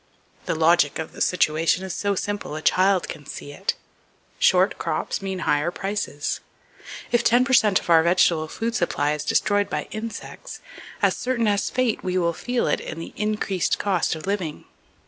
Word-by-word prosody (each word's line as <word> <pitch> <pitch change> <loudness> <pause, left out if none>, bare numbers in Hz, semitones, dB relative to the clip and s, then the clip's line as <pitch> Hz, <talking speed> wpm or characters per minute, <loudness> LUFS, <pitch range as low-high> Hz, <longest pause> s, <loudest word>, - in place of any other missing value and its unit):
The - - 0
logic 160 -2 +3
of 160 - -5
the - - -10
situation 165 +1 +2
is 190 -2 -4
so 200 -1 -1
simple 205 -5 -3
a 155 - -5
child 190 0 +3
can 145 - -9
see 145 - -7
it. 190 +7 -2 0.6
Short - - +3
crops - - -2
mean 190 -2 -4
higher 150 +3 +2
prices. 195 -6 -3 0.7
If 240 0 +3
ten 245 +2 +4
per 260 - -1
cent 210 -6 +5
of - - -12
our 165 -2 +6
vegetable 170 -2 +3
food 230 +8 -3
supply 150 -8 0
is 150 0 -4
destroyed 205 +5 +1
by - - -2
insects, 225 +1 -7 0.4
as - - +4
certain 250 -2 -1
as 200 -1 +1
fate 255 -3 0
we 185 0 -1
will 170 -2 +1
feel 245 +8 -1
it - - 0
in 155 - -7
the 165 - -8
increased 210 -3 0
cost 185 -5 0
of 155 - -8
living. 190 -6 -3
185 Hz, 180 wpm, -23 LUFS, 160-210 Hz, 0.7 s, our